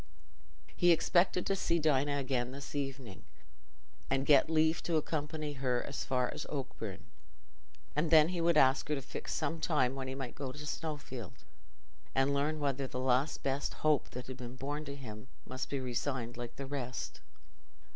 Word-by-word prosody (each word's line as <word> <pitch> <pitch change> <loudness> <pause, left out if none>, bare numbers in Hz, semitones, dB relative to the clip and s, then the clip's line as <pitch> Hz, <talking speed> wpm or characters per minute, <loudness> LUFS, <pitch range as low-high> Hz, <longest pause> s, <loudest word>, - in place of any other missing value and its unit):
He 175 - +4
expected 175 +2 +3
to 195 - +2
see 170 -3 +1
Dinah 145 -2 +2
again 130 -3 0
this 140 0 -7
evening, 135 -7 -4 0.9
and 135 0 +1
get 145 +1 +6
leave 160 +1 +3
to 170 - -1
accompany 155 -1 -1
her 130 -3 0
as 140 - -4
far 125 -2 0
as - - -5
Oakbourne; 140 -3 -5 0.9
and 155 +2 +2
then 155 0 +7
he 180 -2 -1
would 170 -1 +4
ask 135 0 +5
her 150 - +2
to 135 - -3
fix - - -6
some 165 - -1
time 135 -6 +2
when 135 -1 -4
he 130 - -4
might 135 -3 -5
go 135 -2 -4
to 150 +3 -8
Snowfield, 145 - -5 0.7
and 135 +1 +3
learn 150 +2 +1
whether 140 -2 0
the 125 - -5
last 130 +3 +1
best 135 +1 -1
hope 150 -3 +3
that 125 0 -6
had 130 0 -7
been 125 0 -7
born 145 +3 -4
to 140 0 -5
him 110 -4 -8 0.2
must 130 0 -4
be 140 - -1
resigned 125 -1 -2
like 120 -1 -6
the 135 - -5
rest. 130 -3 -4
140 Hz, 175 wpm, -33 LUFS, 130-150 Hz, 0.9 s, then